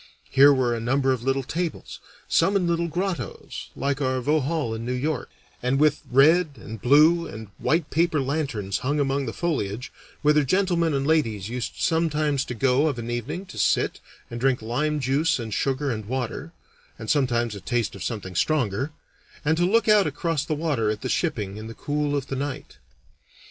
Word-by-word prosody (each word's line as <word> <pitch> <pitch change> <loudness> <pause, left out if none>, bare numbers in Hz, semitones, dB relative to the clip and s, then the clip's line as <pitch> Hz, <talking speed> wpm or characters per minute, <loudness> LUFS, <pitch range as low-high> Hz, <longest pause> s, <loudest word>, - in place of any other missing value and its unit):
Here 140 +2 +7
were 130 -3 +2
a 115 - -2
number 135 +3 +1
of 125 - -4
little 135 +2 0
tables, 170 +5 -4 0.3
some 200 - +3
in 190 -3 +2
little 170 0 0
grottoes, 175 - -4
like 140 +1 -1
our 130 -1 +1
Vauxhall 145 -1 0
in 110 0 -5
New 125 +2 -2
York, 145 +2 -2 0.3
and 125 +2 +1
with 150 0 +3
red 155 +5 +5
and 110 -2 -9
blue 155 +6 +5
and 110 -2 -9
white 160 -1 0
paper 165 -1 +2
lanterns 135 -8 -2
hung 145 +3 -1
among 140 -1 0
the - - -2
foliage, 125 - -2 0.3
whither 150 0 +4
gentlemen 170 0 +1
and 135 0 0
ladies 115 -11 +1
used 125 0 -4
sometimes 155 -4 +1
to 125 - -5
go 135 +5 +3
of 140 -5 -1
an 120 0 -4
evening 125 - -4
to 185 - -9
sit - - +1 0.3
and 120 - -5
drink 130 -2 +1
lime 150 +7 -1
juice 140 +5 +1
and 115 -4 -5
sugar 135 +4 0
and 110 -3 -4
water 130 +6 -4 0.5
(and - - -8
sometimes 120 -6 +1
a 100 - -8
taste 120 -4 -1
of 100 - -7
something 100 -4 -4
stronger), 130 - 0 0.5
and 160 +2 +3
to 175 +2 +2
look 230 +3 +3
out 210 -4 +5
across 150 +1 -1
the 155 0 -2
water 145 -9 0
at 105 0 -2
the 130 - -3
shipping 105 - -1
in 110 +1 -7
the 115 - -9
cool 145 0 -1
of 140 -2 -1
the 135 - -4
night. 135 0 -5
140 Hz, 190 wpm, -25 LUFS, 120-155 Hz, 0.5 s, Here